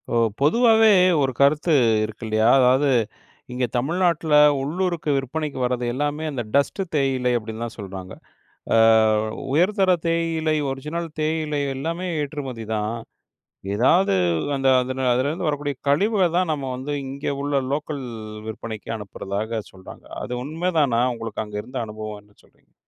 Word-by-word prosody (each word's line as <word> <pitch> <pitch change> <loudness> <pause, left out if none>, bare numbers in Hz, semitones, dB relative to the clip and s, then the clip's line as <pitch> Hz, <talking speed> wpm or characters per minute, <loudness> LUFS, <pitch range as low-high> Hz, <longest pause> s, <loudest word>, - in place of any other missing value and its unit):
இப்போ 120 - +1 0.2
பொதுவாவே 225 - +5 0.3
ஒரு 135 -1 +1
கருத்து 150 +4 +3 0.3
இருக்கு 110 +2 -6
இல்லையா, 110 +1 +2
அதாவது 130 +3 +4 0.7
இங்க 125 0 0
தமிழ்நாட்ல 165 +3 0 0.3
உள்ளூருக்கு 170 +2 -2
விற்பனைக்கு 140 +2 -3
வரது 125 0 -1
எல்லாமே 145 +3 -2
அந்த 125 -4 -3
டஸ்ட்டு 140 +7 +1
தேயிலை 130 -3 +1
அப்டின்னு 110 0 -6
தான் 115 - -8
சொல்றாங்க. 95 -3 -8 0.6
அ - - +5 0.8
உயர்தர 190 +5 +3 0.2
தேயிலை, 165 -2 0
ஒரிஜினல் 150 +6 -4
தேயிலை 155 -1 -1 0.2
எல்லாமே 165 +6 -3
ஏற்றுமதிதான். 115 -7 -4 0.8
எதாவது 150 - +3 0.4
அந்த 135 -1 0
அதுன 130 +1 -3
அதுலேருந்து 145 +7 -1
வரக்கூடிய 145 -1 -2
கழிவுகள் 185 +2 +2
தான், 180 -3 +1
நம்ம 135 -3 -4
வந்து 135 +3 -5
இங்கே 140 +1 -3
உள்ள 140 -1 0
லோக்கல் 145 -1 -3 0.4
விற்பனைக்கு 110 0 -6
அனுப்புறதாக 105 +2 -4
சொல்றாங்க. 95 -1 -13 0.2
அது 125 - -5
உண்மதானா, 155 -6 +1
உங்களுக்கு 115 -2 -5
அங்க 105 0 -7
இருந்த 130 0 -6
அனுபவம், 105 -1 -7
என்ன 105 0 -27
சொல்றீங்க? - - -30
140 Hz, 130 wpm, -23 LUFS, 115-160 Hz, 0.8 s, பொதுவாவே